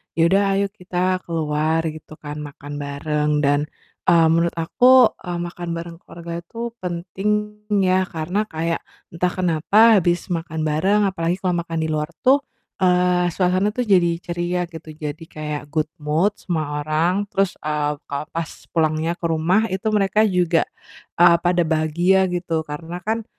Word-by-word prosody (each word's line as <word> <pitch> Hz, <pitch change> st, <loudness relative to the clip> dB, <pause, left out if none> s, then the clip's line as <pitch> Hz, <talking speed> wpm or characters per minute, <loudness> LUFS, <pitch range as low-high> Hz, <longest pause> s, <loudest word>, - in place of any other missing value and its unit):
"Ya 165 Hz, -, +1 dB
udah, 200 Hz, +1 st, +4 dB
ayo 200 Hz, 0 st, +2 dB
kita 185 Hz, -2 st, -1 dB
keluar," 160 Hz, 0 st, 0 dB
gitu 155 Hz, 0 st, -12 dB
kan, 150 Hz, 0 st, -7 dB
"makan 145 Hz, 0 st, -8 dB
bareng." 150 Hz, +1 st, -1 dB
Dan, 145 Hz, +1 st, +2 dB, 0.4 s
mmm, 165 Hz, -2 st, +6 dB
menurut 170 Hz, +1 st, +1 dB
aku, 250 Hz, +9 st, +5 dB, 0.2 s
eee, 175 Hz, -1 st, -2 dB
makan 175 Hz, 0 st, -6 dB
bareng 165 Hz, 0 st, -7 dB
keluarga 170 Hz, -1 st, -7 dB
itu 230 Hz, +7 st, -6 dB
penting 180 Hz, +3 st, -3 dB, 0.5 s
ya, 185 Hz, 0 st, +2 dB
karena 180 Hz, +7 st, -2 dB
kayak 165 Hz, +1 st, -2 dB, 0.3 s
entah 180 Hz, +2 st, 0 dB
kenapa 190 Hz, +5 st, +4 dB
habis 175 Hz, +2 st, -1 dB
makan 160 Hz, -2 st, -3 dB
bareng, 190 Hz, +8 st, +2 dB
apalagi 175 Hz, -3 st, 0 dB
kalau 180 Hz, -2 st, +1 dB
makan 165 Hz, -1 st, -2 dB
di -, -, -1 dB
luar 150 Hz, 0 st, -1 dB, 0.2 s
tuh, 270 Hz, +3 st, +5 dB, 0.4 s
eee, 180 Hz, -1 st, +3 dB
suasananya 185 Hz, +3 st, +1 dB
tuh 250 Hz, -1 st, -1 dB
jadi 180 Hz, -3 st, +5 dB
ceria 175 Hz, +1 st, -2 dB
gitu. 160 Hz, -1 st, -10 dB
Jadi 155 Hz, +1 st, -6 dB
kayak 150 Hz, -1 st, -5 dB
good 155 Hz, -1 st, 0 dB
mood 155 Hz, +7 st, +1 dB
semua 155 Hz, -4 st, -2 dB
orang, 170 Hz, +6 st, +1 dB
terus, 195 Hz, -2 st, 0 dB
eee, 150 Hz, -1 st, -1 dB
kalo 140 Hz, +1 st, -3 dB
pas 165 Hz, -1 st, -3 dB, 0.2 s
pulangnya 160 Hz, 0 st, +1 dB
ke 170 Hz, -, -4 dB
rumah, 165 Hz, +6 st, +2 dB
itu 190 Hz, +3 st, -2 dB
mereka 210 Hz, 0 st, +2 dB
juga, 180 Hz, -5 st, +2 dB, 0.6 s
eee, 170 Hz, -1 st, +7 dB
pada 175 Hz, 0 st, +3 dB
bahagia 170 Hz, +4 st, +2 dB
gitu. 170 Hz, -2 st, -1 dB
Karena 165 Hz, +4 st, -6 dB
kan, 220 Hz, 0 st, -2 dB
170 Hz, 155 wpm, -21 LUFS, 155-185 Hz, 0.6 s, eee